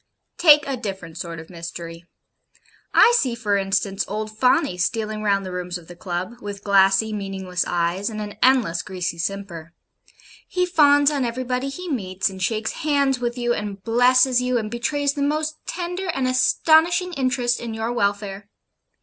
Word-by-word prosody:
Take 300 -4 +7
a 275 - -1
different 190 -7 -6
sort 170 -1 -6
of 160 +3 -12
mystery. 170 0 -8 0.9
I 480 - +6
see, 250 -3 -1
for 210 -3 0
instance, 195 0 0
old 215 +1 -5
Fawney 235 -6 +2
stealing 215 +3 -1
round 200 -2 +1
the 185 - -6
rooms 180 0 -4
of 170 -2 -15
the 175 - -11
Club, 185 +7 -5
with 205 -1 -7
glassy, 195 +2 +3
meaningless 190 -3 -3
eyes, 175 +4 -1
and 215 -1 -6
an 210 -1 -6
endless 240 -10 +3
greasy 180 -3 -4
simper 170 -3 -5 0.7
he 365 0 0
fawns 290 -4 +4
on 280 -3 -1
everybody 250 +2 -2
he 360 +7 -7
meets, 195 - -2
and 190 0 -10
shakes 220 +3 -1
hands 280 -4 +1
with 240 0 -3
you, 240 -1 0
and 205 -3 -5
blesses 250 +2 +4
you, 250 0 0
and 215 -2 -3
betrays 285 +4 -1
the 285 - -4
most 310 +2 -1
tender 355 +2 -4
and 270 -7 -1
astonishing 325 +7 +3
interest 255 -4 0
in 230 -2 -5
your 225 +2 -2
welfare. 200 -2 -2
220 Hz, 165 wpm, -22 LUFS, 195-265 Hz, 0.9 s, Take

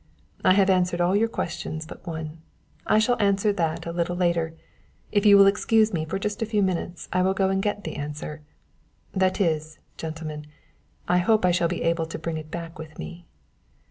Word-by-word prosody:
"I - - +6
have 195 0 +4
answered 180 -1 +1
all 175 +2 +3
your 220 +3 +3
questions 160 -6 -4
but 170 - -12
one; 160 -1 -5 0.5
I - - +4
shall 245 +2 +2
answer 200 +1 +2
that 165 -3 -1
a 170 - -3
little 170 +1 -1
later, 170 -2 0 0.6
if 205 0 +3
you 200 -1 +9
will 200 - +8
excuse 215 +2 +3
me 160 -2 -1
for 185 +5 -3
just 210 +2 -3
a - - +2
few 210 -2 +1
minutes 175 -2 -2
I 185 - +3
will 190 +1 +2
go 195 -1 +2
and 195 0 +1
get 205 0 -2
the - - -5
answer, 150 +1 -5 0.7
that 190 0 +1
is, 155 -4 0 0.2
gentlemen, 155 -2 -6 0.6
I 180 0 +3
hope 210 +2 +3
I 180 - +4
shall 175 -1 +2
be 175 +1 -3
able 165 -1 +1
to 165 - -5
bring 160 0 -3
it 155 0 -8
back 170 +1 -7
with 160 -1 -9
me." 175 -1 -8
175 Hz, 205 wpm, -25 LUFS, 160-195 Hz, 0.7 s, you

